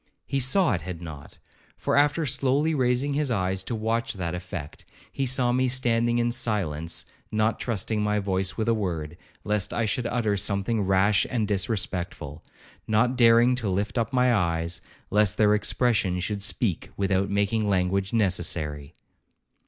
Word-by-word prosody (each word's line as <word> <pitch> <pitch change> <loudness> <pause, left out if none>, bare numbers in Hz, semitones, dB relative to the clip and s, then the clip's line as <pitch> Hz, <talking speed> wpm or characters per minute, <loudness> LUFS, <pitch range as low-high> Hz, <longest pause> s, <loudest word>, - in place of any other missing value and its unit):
He 140 - -1
saw 160 +8 +3
it 85 - -2
had 85 0 -6
not; 80 -4 -10 0.4
for - - -1
after 150 +3 +3
slowly 140 +3 +1
raising 130 +1 +1
his 145 -1 0
eyes 95 -4 0
to 115 - -3
watch 115 +3 -1
that 90 -3 -3
effect, 90 -4 -7 0.3
he 135 - -2
saw 125 -1 +1
me 130 +1 +2
standing 120 -2 +1
in 120 0 +1
silence, 85 -9 -2 0.3
not 110 +1 +1
trusting 110 -1 -1
my 105 0 +1
voice 95 -2 -1
with 110 -1 -1
a 115 - +4
word, 85 -7 -3 0.3
lest 105 -2 -1
I 115 - +1
should 115 +3 -1
utter 115 -4 0
something 100 +2 0
rash 95 +2 +3
and 115 -5 -1
disrespectful,—not 100 - -2
daring 120 +1 +5
to 120 -5 -2
lift 100 +6 -1
up 115 - -1
my 125 -1 +3
eyes, 85 -4 -1 0.3
lest 105 0 +2
their 105 -1 +4
expression 105 -3 +1
should 100 +3 -3
speak 100 -2 -1
without 95 0 +1
making 100 +2 0
language 95 0 0
necessary. 85 -9 -1
105 Hz, 155 wpm, -26 LUFS, 95-120 Hz, 0.4 s, daring